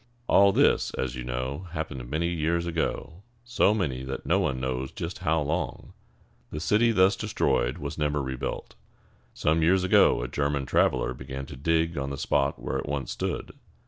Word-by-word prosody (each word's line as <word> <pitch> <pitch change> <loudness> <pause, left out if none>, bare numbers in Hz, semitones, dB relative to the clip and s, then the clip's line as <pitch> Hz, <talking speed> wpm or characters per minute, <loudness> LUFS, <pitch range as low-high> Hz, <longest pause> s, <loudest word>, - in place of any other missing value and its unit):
All 100 -3 +5
this, - - +3
as 65 -1 -2
you 65 - -5
know, 65 +7 -4
happened 65 -6 -5
many 80 +4 -1
years 85 0 0
ago, 85 +1 -3 0.2
so 120 -4 +3
many 80 -12 -1
that 65 +1 -5
no - - +3
one 65 - 0
knows 65 0 -2
just 85 +2 -6
how 80 -2 +1
long. 80 +5 -3 0.6
The 75 - -5
city 110 +8 +3
thus 95 -2 +4
destroyed 70 - 0
was 70 +1 -6
never 75 -1 +1
rebuilt. 65 -2 -4 0.6
Some 80 +2 +1
years 90 +3 +3
ago 95 -8 +4
a - - -3
German 70 +1 -1
traveler - - +2
began 65 +1 -7
to 70 - -9
dig 80 +3 0
on 70 0 -3
the 70 - -5
spot 70 0 0
where - - -3
it - - -5
once 70 -1 -3
stood. - - -3
75 Hz, 175 wpm, -27 LUFS, 65-85 Hz, 0.6 s, All